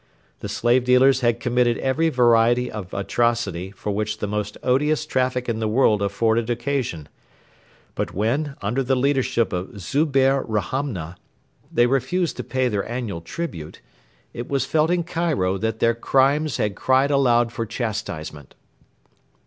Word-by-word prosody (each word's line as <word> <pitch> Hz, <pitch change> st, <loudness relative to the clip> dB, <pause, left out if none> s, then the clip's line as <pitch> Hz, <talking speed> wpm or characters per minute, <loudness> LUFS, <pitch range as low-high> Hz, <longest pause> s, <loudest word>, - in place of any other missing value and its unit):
The -, -, -6 dB
slave 120 Hz, +2 st, +2 dB
dealers 125 Hz, +2 st, +4 dB
had 120 Hz, -1 st, +1 dB
committed 120 Hz, -1 st, +1 dB
every 155 Hz, +5 st, +1 dB
variety 120 Hz, -2 st, +3 dB
of 100 Hz, -4 st, -7 dB
atrocity 100 Hz, -3 st, -1 dB
for 100 Hz, +1 st, -5 dB
which 105 Hz, +1 st, -2 dB
the -, -, -3 dB
most 105 Hz, 0 st, -3 dB
odious 150 Hz, +4 st, +1 dB
traffic 130 Hz, -3 st, -1 dB
in 115 Hz, -2 st, -1 dB
the 110 Hz, -, -1 dB
world 110 Hz, -2 st, +3 dB
afforded 110 Hz, +3 st, 0 dB
occasion; 120 Hz, -, -2 dB, 0.9 s
but -, -, -3 dB
when, 135 Hz, +8 st, -1 dB
under 115 Hz, +7 st, 0 dB
the 130 Hz, 0 st, +1 dB
leadership 130 Hz, -4 st, +1 dB
of 90 Hz, +3 st, -5 dB
Zubehr 135 Hz, -, +2 dB
Rahamna, 105 Hz, -, -3 dB, 0.5 s
they 120 Hz, -, +4 dB
refused 135 Hz, +7 st, 0 dB
to -, -, -4 dB
pay 130 Hz, -1 st, 0 dB
their 105 Hz, -3 st, -2 dB
annual 115 Hz, -8 st, -4 dB
tribute, 85 Hz, -, -6 dB, 0.5 s
it 120 Hz, -, -6 dB
was 140 Hz, -2 st, 0 dB
felt 155 Hz, +3 st, +1 dB
in 175 Hz, -1 st, +1 dB
Cairo 160 Hz, -, -1 dB
that 110 Hz, +2 st, -2 dB
their 115 Hz, +1 st, +2 dB
crimes 135 Hz, +4 st, +1 dB
had 105 Hz, -1 st, 0 dB
cried 130 Hz, +5 st, +2 dB
aloud 120 Hz, -4 st, +3 dB
for 115 Hz, -1 st, -4 dB
chastisement. 85 Hz, -, -5 dB
120 Hz, 150 wpm, -22 LUFS, 105-135 Hz, 0.9 s, dealers